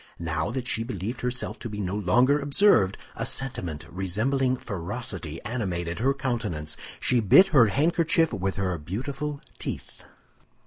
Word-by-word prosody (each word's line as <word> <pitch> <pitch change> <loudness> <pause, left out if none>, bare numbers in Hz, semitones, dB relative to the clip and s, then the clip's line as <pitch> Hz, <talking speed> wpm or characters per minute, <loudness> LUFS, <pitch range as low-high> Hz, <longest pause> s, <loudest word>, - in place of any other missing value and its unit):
Now 80 +1 -2
that 125 +1 -3
she 115 - 0
believed 115 +1 -4
herself 125 0 -2
to 120 - -6
be 105 -1 -6
no 95 -1 -2
longer 125 +9 +3
observed, 140 - +4 0.2
a - - -3
sentiment 90 - -3
resembling 125 +9 0
ferocity 95 -5 -5
animated 90 -7 -3
her 135 +4 +2
countenance. 115 - -2 0.2
She 125 - +2
bit 150 - +7
her 135 -10 +6
handkerchief 165 - +2
with 95 0 -1
her 95 -2 -1
beautiful 135 - -4 0.2
teeth. - - -6
115 Hz, 140 wpm, -26 LUFS, 90-135 Hz, 0.2 s, bit